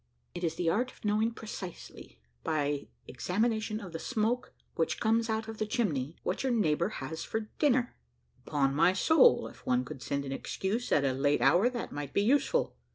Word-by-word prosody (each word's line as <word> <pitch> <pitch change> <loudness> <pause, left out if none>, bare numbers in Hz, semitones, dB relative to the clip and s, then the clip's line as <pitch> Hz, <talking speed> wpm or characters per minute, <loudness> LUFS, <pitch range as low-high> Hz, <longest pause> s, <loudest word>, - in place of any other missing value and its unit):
"It 175 - -6
is 165 -1 0
the 170 0 -2
art 245 +9 +1
of - - -15
knowing 215 +2 +2
precisely, 210 - -9 0.2
by 145 -2 -1 0.2
examination 215 - -1
of 195 -5 -8
the 165 - -4
smoke 240 +3 -1 0.2
which 165 - -1
comes 225 +1 +2
out 220 0 -1
of 220 -1 -7
the 215 - -1
chimney, 160 - -1
what - - -1
your 265 - 0
neighbour 170 -6 +2 0.2
has 160 +3 -5
for 220 - -2 0.2
dinner." 255 -5 +2 0.5
"Upon 140 -2 +1
my 165 +5 +4
soul, 320 - +5
if - - -14
one 125 0 +1
could 130 - -8
send 140 +1 -2
an 135 - -5
excuse 200 - -3
at 140 - +4
a 135 - +2
late 145 +2 +2
hour, 175 - +5
that 245 -2 -5
might 145 -1 -5
be 200 - +2
useful." 285 - +2
195 Hz, 190 wpm, -30 LUFS, 145-225 Hz, 0.5 s, soul